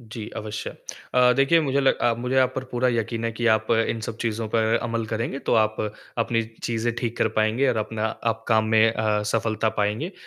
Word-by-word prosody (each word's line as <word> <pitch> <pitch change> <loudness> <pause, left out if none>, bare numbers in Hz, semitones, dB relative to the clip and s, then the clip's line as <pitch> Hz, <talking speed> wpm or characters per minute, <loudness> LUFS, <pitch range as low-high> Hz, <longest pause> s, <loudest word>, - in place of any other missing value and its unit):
जी, 110 -2 -8
अवश्य। 110 0 -5 0.4
अ, 125 0 +6
देखिए 135 +5 +4
मुझे 140 -2 +1
लग 135 - +3
अ, 120 - +2
मुझे 125 +2 -2
आप 130 -1 +3
पर 130 - -3
पूरा 125 +1 +1
यकीन 115 -1 -1
है 115 - 0
कि 120 +1 -2
आप 110 0 -3 0.2
इन 115 - -2
सब 110 +1 -5
चीज़ों 115 -1 -2
पर 110 +1 +2
अमल 115 -2 -2
करेंगे 115 +5 -3
तो - - +4
आप 110 -1 +2 0.4
अपनी 115 0 +1 0.2
चीज़े 120 0 -1
ठीक 120 -1 -3
कर 110 - +3
पाएँगे 110 +5 +2
और 120 - +1
अपना 110 0 -2
आप 115 0 -3
काम 110 -1 +4
में 110 0 +5
अ, 105 -2 0
सफलता 110 +1 0
पाएँगे 110 - -1
115 Hz, 210 wpm, -24 LUFS, 110-120 Hz, 0.4 s, अ